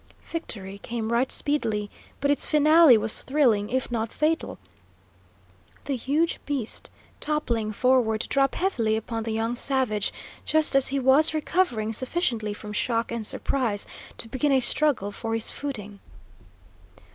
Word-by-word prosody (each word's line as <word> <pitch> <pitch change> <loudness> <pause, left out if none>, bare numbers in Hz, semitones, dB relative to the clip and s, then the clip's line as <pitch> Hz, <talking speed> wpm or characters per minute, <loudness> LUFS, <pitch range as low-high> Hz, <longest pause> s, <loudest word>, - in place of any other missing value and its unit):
Victory 200 - -6
came 230 +1 -4
right 245 +3 +1
speedily, 220 -8 -1 0.3
but 280 0 +2
its 285 - +3
finale 305 -3 +6
was 220 +1 -2
thrilling, 245 -8 +2
if 255 0 -2
not 225 -1 -2
fatal, 320 +2 -1 1.3
the 280 - -1
huge 290 +7 0
beast 275 -6 -2 0.3
toppling 235 -8 -1
forward 235 -1 +2
to - - -2
drop 275 -1 +1
heavily 235 - 0
upon 225 +1 -4
the 225 0 -4
young 225 +2 -1
savage, 250 -6 0 0.3
just 310 -1 +3
as 275 -1 +4
he 275 - 0
was 275 +4 +4
recovering 290 -9 0
sufficiently 235 - -1
from 210 0 -8
shock 230 +2 -1
and 230 -2 -1
surprise 230 -7 -1 0.3
to - - -2
begin 260 +5 0
a 270 - +4
struggle 255 -5 +2
for 225 +2 -3
his 225 - -2
footing. 210 -8 -6
240 Hz, 145 wpm, -25 LUFS, 220-285 Hz, 1.3 s, finale